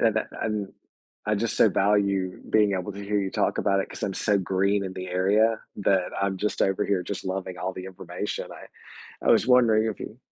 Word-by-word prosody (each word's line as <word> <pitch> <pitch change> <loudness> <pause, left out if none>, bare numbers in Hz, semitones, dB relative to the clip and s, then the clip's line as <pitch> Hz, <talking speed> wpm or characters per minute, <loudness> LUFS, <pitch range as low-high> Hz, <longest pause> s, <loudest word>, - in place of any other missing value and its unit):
the 115 - +5
that, 110 - -1
un 105 -3 -2 0.5
I - - +2
just - - -1
so - - +7
value 100 -2 +1
being 105 -2 +4
able 95 +1 -2
to 100 +1 -8
hear 105 0 0
you 95 -1 -2
talk - - 0
about 100 -1 +2
it - - -4
'cause - - -9
I'm 95 - -1
so 105 -1 +2
green 100 +2 +1
in 95 -1 -5
the 95 0 -6
area 105 +5 +2 0.2
that 95 -2 +1
I'm 100 -1 -1
just 105 - -1
over 95 +1 +1
here 95 -3 +1
just 100 0 -5
loving 95 -1 -4
all 95 +2 -2
the 90 - -7
information, 95 +1 -5
I - - -12 0.6
I - - +5
was - - +4
wondering 115 -4 +5
if 110 - -4
you 115 - -8
100 Hz, 220 wpm, -26 LUFS, 95-105 Hz, 0.6 s, so